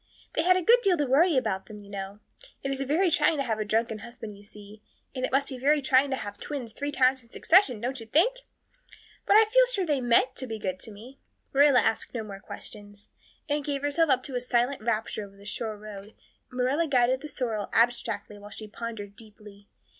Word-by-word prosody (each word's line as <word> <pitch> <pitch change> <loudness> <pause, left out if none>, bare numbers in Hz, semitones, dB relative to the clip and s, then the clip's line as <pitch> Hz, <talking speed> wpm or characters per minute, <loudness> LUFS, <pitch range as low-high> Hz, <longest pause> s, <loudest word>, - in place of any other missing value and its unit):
They - - +1
had 365 +2 +4
a 370 - -1
good 475 +6 +5
deal 385 -6 +3
to 295 - +1
worry 285 +3 +4
them, 205 -2 -5
you - - -15
know. 200 +1 -7 0.4
It's 275 0 -2
a - - -1
very 340 +5 +2
trying 320 -1 +3
to 275 - 0
have 220 -4 -2
a - - 0
drunken 220 +1 -1
husband, 225 -2 -9
you 200 - -15
see; 205 +1 -14 0.3
and 255 - -5
it - - -1
must 275 +1 +2
be 260 -2 -7
very 295 +4 +3
trying 265 0 +3
to 265 - 0
have 205 -5 -7
twins 255 -7 -6
three 285 +3 -4
times 260 -1 +3
in 235 - -21
succession, 300 - +3
don't 250 +4 -3
you 225 - -10
think? 375 - +3 0.9
But - - +5
I 440 +1 +8
feel - - +4
sure 405 -7 0
they 295 -5 0
meant 250 +2 +3
to 260 - -4
be 225 -1 -4
good 185 -3 -4
to 220 - -10
me." 235 +6 -13 0.3
Marilla 280 -1 +6
asked 225 - -1
no 225 - -2
more 200 -2 -9
questions. 205 0 -11 0.4
Anne 295 0 0
gave 285 -1 -3
herself 295 +3 +2
up 260 -1 +2
to 270 - -6
a 245 - -1
silent 250 +1 0
rapture 220 -1 -2
over 200 0 -13
the 200 - -16
shore 215 0 -3
road 210 0 -10 0.3
and 255 - -11
Marilla 275 +6 +1
guided 255 -1 +2
the 305 - -7
sorrel 230 -8 -3
abstractedly 225 -3 0
while 205 0 -11
she 215 +1 -8
pondered 210 -2 -7
deeply. 210 -2 -14
245 Hz, 225 wpm, -27 LUFS, 215-285 Hz, 0.9 s, I